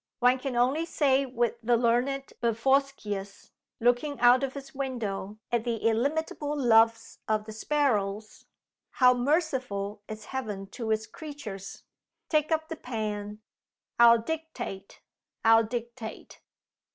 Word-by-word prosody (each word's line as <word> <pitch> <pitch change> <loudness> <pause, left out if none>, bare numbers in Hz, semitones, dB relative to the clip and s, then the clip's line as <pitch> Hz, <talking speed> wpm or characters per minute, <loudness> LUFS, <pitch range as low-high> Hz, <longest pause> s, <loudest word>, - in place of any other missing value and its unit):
One 250 +1 +3
can 260 -1 -4
only 260 +7 +2
say 275 -4 +2
with 240 -2 -1
the 240 +1 +3
learned 250 +4 0
Bevorskius, 230 -4 -1 0.3
looking 245 +5 +1
out 245 +2 +6
of 270 0 -3
his 275 -1 -9
window 220 -7 -4
at 235 -2 +1
the 235 -1 -1
illimitable 290 +5 -1
loves 225 -2 +3
of 215 -1 0
the 220 - -8
sparrows, 215 -5 -1 0.5
'How 250 -1 +6
merciful 250 - -1
is 215 -1 -8
Heaven 210 -7 -4
to 225 0 -5
its 220 0 +1
creatures!' 235 - -8 0.5
Take 305 0 +1
up 315 0 +1
the 325 - -6
pen. 210 -4 -4 0.6
I'll 235 0 +8
dictate! 310 -8 -6 0.4
I'll 225 0 +6
dictate!" 235 0 -7
240 Hz, 125 wpm, -28 LUFS, 220-275 Hz, 0.6 s, I'll